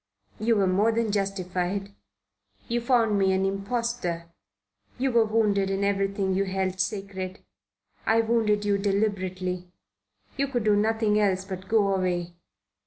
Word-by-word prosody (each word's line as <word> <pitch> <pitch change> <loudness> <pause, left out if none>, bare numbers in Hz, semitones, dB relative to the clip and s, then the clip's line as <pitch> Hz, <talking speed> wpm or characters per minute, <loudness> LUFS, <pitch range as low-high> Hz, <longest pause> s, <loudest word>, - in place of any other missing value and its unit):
"You 225 +2 +2
were 200 -2 +3
more 195 +5 +3
than 225 -1 0
justified. 195 0 -2 0.7
You 240 0 0
found 230 -4 +2
me 190 -1 +3
an 190 0 +1
impostor. 195 -4 -2 0.7
You 265 +1 0
were 230 -2 +4
wounded 210 -3 +1
in 195 +1 -1
everything 195 -1 0
you 195 +1 +1
held 190 -1 -2
sacred. 190 -1 -3 0.6
I 225 +1 +4
wounded 220 -2 +1
you 200 -1 +2
deliberately. 185 -3 -1 0.7
You 275 - +1
could 245 -4 -1
do 210 -1 +4
nothing 215 0 +2
else 190 -2 +1
but 190 -1 -7
go 205 -2 +3
away. 180 -2 -1
200 Hz, 140 wpm, -26 LUFS, 190-220 Hz, 0.7 s, were